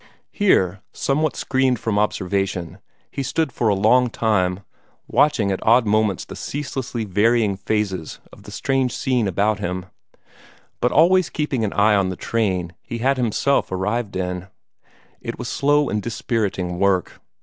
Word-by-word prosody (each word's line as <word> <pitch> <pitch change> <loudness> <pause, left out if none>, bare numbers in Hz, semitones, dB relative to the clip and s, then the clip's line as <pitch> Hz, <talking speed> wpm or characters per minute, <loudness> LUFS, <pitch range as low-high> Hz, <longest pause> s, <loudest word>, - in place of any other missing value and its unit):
Here, 95 - +2
somewhat 150 +3 0
screened 130 -2 +1
from 105 -2 -1
observation, 95 -4 -1 0.3
he - - -3
stood 140 +2 -1
for 115 - -1
a 105 - +3
long 120 +5 +4
time, 95 -5 0 0.5
watching 115 -9 +2
at 95 - -2
odd 115 +2 +5
moments 105 -2 +1
the - - -9
ceaselessly 130 -4 -4
varying 105 +1 +2
phases 95 -5 -2
of - - -14
the - - -12
strange 135 -2 0
scene 125 -6 0
about 100 +3 +1
him, 90 -2 -3 0.9
but 125 - +1
always 180 +3 +4
keeping 145 -6 -2
an 105 - -1
eye 105 +1 +4
on 100 -2 +2
the 95 - -4
train 95 -7 -1
he 120 - -6
had 135 +3 +1
himself 125 +2 +1
arrived 105 +3 -2
in. 90 0 -3 0.7
It - - -5
was - - -5
slow 145 +1 +2
and 105 - -1
dispiriting 95 -6 -2
work. 95 -3 +1
110 Hz, 150 wpm, -21 LUFS, 95-130 Hz, 0.9 s, odd